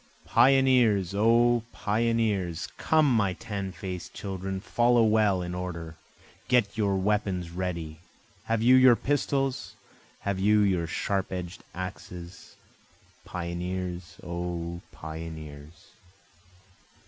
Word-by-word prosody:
Pioneers! 125 -8 +4
O 115 +3 +4
Pioneers! 105 -5 0
Come 155 -1 +3
my 105 -7 +2
tan 100 +1 -5
faced 90 -1 -7
children, 95 -1 -4
Follow 120 +4 +3
well 105 -4 +3
in 90 0 -5
order, 85 -3 -5 0.5
get 115 -5 +2
your 100 -3 +1
weapons 95 -3 -1
ready, 85 -3 -4 0.5
Have 115 0 0
you 125 +2 +6
your 130 -2 +7
pistols? 135 0 -1 0.5
have 100 -1 -2
you 105 +2 +4
your 90 -5 +1
sharp 95 +3 -2
edged 90 -1 -6
axes? 90 -1 -8 0.7
Pioneers! 90 0 -4
O 85 0 -4
pioneers! 80 0 -9
95 Hz, 100 wpm, -27 LUFS, 85-110 Hz, 0.7 s, your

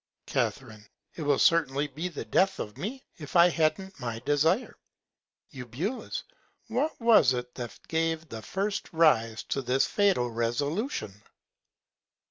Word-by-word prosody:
Ca. - - +1 0.6
It - - -8
will 145 -2 +2
certainly 150 -4 +3
be 150 +5 -4
the 170 - -6
Death 195 0 +2
of 105 - -5
me, 220 - -6
if 150 +1 -9
I 175 0 +7
han't 175 +3 -1
my 115 -3 -4
Desire. 160 - +2 0.8
Eu. 130 -3 -8 1.0
What 265 +8 -1
was 225 - +5
it 125 0 -4
that 120 -3 -7
gave 165 0 -1
the 110 -1 -7
first 195 - -3
Rise 115 -9 +3
to 135 - -2
this 130 +1 +2
fatal 190 - +2
Resolution? 120 - -2
155 Hz, 130 wpm, -28 LUFS, 125-190 Hz, 1.0 s, I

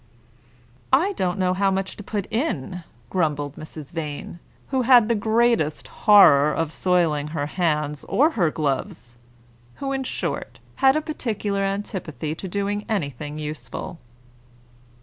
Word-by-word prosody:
"I 340 +10 +4
don't 185 - -1
know 185 -1 +1
how 195 +1 +2
much 190 0 -2
to 205 - -9
put 200 -1 -3
in," 185 - -2 0.3
grumbled 145 -5 -1
Mrs. 155 -2 -9
Vane, 155 +1 -5 0.3
who 265 -1 +1
had 245 -3 +6
the 235 - +2
greatest 220 -7 +1
horror 150 -9 +6
of 160 0 -1
soiling 165 -5 +1
her 150 -2 -3
hands 150 -3 -1
or 300 +5 +3
her 180 - +2
gloves; 135 -5 -3 0.6
who, 275 -1 -4
in 270 -1 -1
short, - - -4 0.2
had 270 0 +5
a 310 - +1
particular 215 -10 -2
antipathy 190 -6 -3
to 180 +4 -6
doing 200 +2 -2
anything 150 - -3
useful. 155 +2 -6
185 Hz, 135 wpm, -23 LUFS, 150-220 Hz, 0.6 s, had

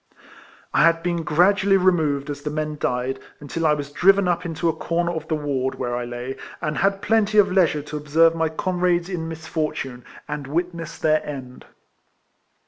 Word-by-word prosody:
I - - +4
had 165 0 +4
been 175 -1 0
gradually 195 +5 +3
removed 155 -6 +1
as 145 - -6
the 150 - -3
men 155 0 -3
died, 125 +2 -1 0.2
until 160 +3 -2
I 150 - +4
was 145 -1 -6
driven 195 +4 +4
up 175 0 0
into 165 +1 -2
a 165 - +2
corner 170 +1 -1
of 160 -1 -5
the 160 - 0
ward, 140 -3 -2
where 120 -1 -3
I 120 0 -3
lay, 120 +2 -6 0.2
and 150 -2 -2
had 195 0 +1
plenty 215 0 +2
of 200 -2 +5
leisure 170 -6 +2
to 150 +1 -6
observe 160 +3 +4
my 165 -1 0
comrades 175 +1 0
in 170 -4 -3
misfortune, 155 -6 -4 0.2
and 150 -2 -5
witness 170 +2 -3
their 155 -1 +2
end. 130 -4 -8
160 Hz, 180 wpm, -23 LUFS, 145-175 Hz, 0.2 s, of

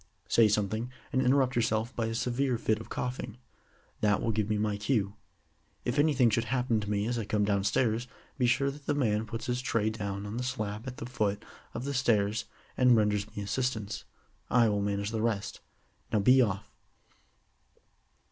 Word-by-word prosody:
Say 115 -2 +5
something, 105 +3 0 0.2
and 130 - +3
interrupt 130 0 +3
yourself 115 0 0
by 115 -1 0
a 115 - -3
severe 125 +2 0
fit 110 -2 0
of 110 - -10
coughing. 125 -2 -4 0.6
That 105 -1 +3
will 115 - 0
give 105 -1 -1
me 105 - +1
my 105 -1 0
cue. 105 -2 0 0.7
If 125 +4 0
anything 140 -6 +4
should 115 +2 +1
happen 120 -1 +1
to 105 -1 -5
me 105 0 0
as 120 +1 -1
I 110 - -3
come 105 0 +1
downstairs, 110 +4 +1 0.3
be 125 - +3
sure 140 +3 +2
that 145 0 -13
the 145 - +1
man 110 -5 +1
puts 115 +1 -5
his 125 0 -1
tray 110 -3 0
down 100 -2 -4
on 105 +3 -5
the 125 - -2
slab 110 -2 -3
at 130 0 -6
the - - -5
foot 105 -5 -1 0.3
of 120 - -3
the 140 +1 -2
stairs 110 -5 +1 0.3
and 125 -1 +5
renders 105 -1 +1
me 105 - -2
assistance. 110 -1 -2 0.5
I 120 -2 +4
will 105 -1 0
manage 100 +1 -1
the 110 -1 -1
rest. 110 -3 -1 0.5
Now - - +2
be 125 +6 +6
off." 100 -5 0
115 Hz, 185 wpm, -30 LUFS, 105-125 Hz, 0.7 s, be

